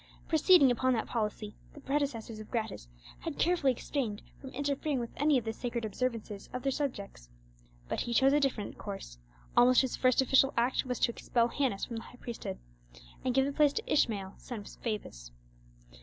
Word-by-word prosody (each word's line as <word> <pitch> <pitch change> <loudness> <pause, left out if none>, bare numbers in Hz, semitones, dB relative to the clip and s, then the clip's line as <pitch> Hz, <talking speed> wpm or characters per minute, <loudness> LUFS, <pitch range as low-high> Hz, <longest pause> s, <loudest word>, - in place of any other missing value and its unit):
Proceeding 315 -3 +6
upon 255 +2 +2
that 225 - 0
policy, 210 -2 -3 0.2
the - - -10
predecessors 270 -6 -2
of 215 - -9
Gratus 220 - -3 0.3
had - - -5
carefully 335 -6 +3
abstained 230 -4 -3 0.2
from 265 - -9
interfering 280 +1 -1
with 235 -1 -4
any 295 0 +3
of 240 - -2
the 225 - -2
sacred 235 -1 -3
observances 220 -2 -3
of 250 - -4
their 275 - +1
subjects. 200 - -4 0.6
But - - -2
he 240 - -3
chose 270 +2 +5
a 295 - +5
different 265 -7 -2
course: 195 - -7 0.4
almost 250 +1 +6
his 260 -2 -2
first 255 -1 +3
official 270 +1 +4
act 245 +3 +2
was 250 -1 -1
to - - +3
expel 235 0 +1
Hannas 250 -7 0
from 235 - -6
the - - -4
high - - -13
priesthood, 235 - -5 0.7
and 250 -1 0
give 270 0 +4
the 280 - -1
place 290 -1 +4
to 450 - -2
Ishmael, 200 -9 +1
son 240 -4 -7
of - - -13
Fabus. 200 - -5
245 Hz, 185 wpm, -31 LUFS, 220-275 Hz, 0.7 s, Proceeding